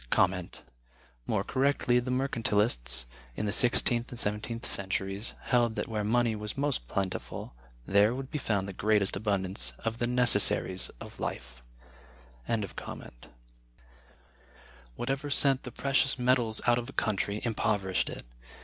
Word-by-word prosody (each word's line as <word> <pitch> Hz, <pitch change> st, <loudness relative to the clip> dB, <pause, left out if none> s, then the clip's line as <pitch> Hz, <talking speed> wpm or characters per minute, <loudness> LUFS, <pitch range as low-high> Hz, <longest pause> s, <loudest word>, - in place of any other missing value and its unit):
More -, -, 0 dB
correctly 130 Hz, -2 st, +1 dB
the 125 Hz, +1 st, -5 dB
Mercantilists 105 Hz, -, 0 dB, 0.3 s
(in 105 Hz, -, -3 dB
the 100 Hz, -, 0 dB
sixteenth 120 Hz, -1 st, +4 dB
and 120 Hz, -, -8 dB
seventeenth 105 Hz, +2 st, -2 dB
centuries) 95 Hz, +2 st, 0 dB
held 120 Hz, -2 st, +1 dB
that 105 Hz, -, -3 dB
where 110 Hz, -2 st, -2 dB
money 115 Hz, +1 st, +2 dB
was 105 Hz, +4 st, -6 dB
most 140 Hz, -, -1 dB
plentiful, 95 Hz, -5 st, -4 dB, 0.3 s
there 105 Hz, +4 st, +3 dB
would 135 Hz, 0 st, -7 dB
be 150 Hz, -, -2 dB
found 100 Hz, -6 st, -1 dB
the 100 Hz, -, -6 dB
greatest 105 Hz, 0 st, +1 dB
abundance 95 Hz, -1 st, -1 dB
of 115 Hz, 0 st, -4 dB
the 120 Hz, -, 0 dB
necessaries 120 Hz, -6 st, +3 dB
of -, -, -11 dB
life.(100) 60 Hz, -, -7 dB, 1.8 s
Whatever 135 Hz, -, -3 dB
sent 135 Hz, -2 st, +3 dB
the 125 Hz, -, -8 dB
precious 135 Hz, 0 st, +1 dB
metals 125 Hz, -3 st, +2 dB
out 120 Hz, 0 st, +4 dB
of 120 Hz, +2 st, -7 dB
a -, -, -10 dB
country 105 Hz, -2 st, -1 dB
impoverished 105 Hz, -5 st, 0 dB
it. -, -, -8 dB
110 Hz, 130 wpm, -29 LUFS, 95-125 Hz, 1.8 s, sixteenth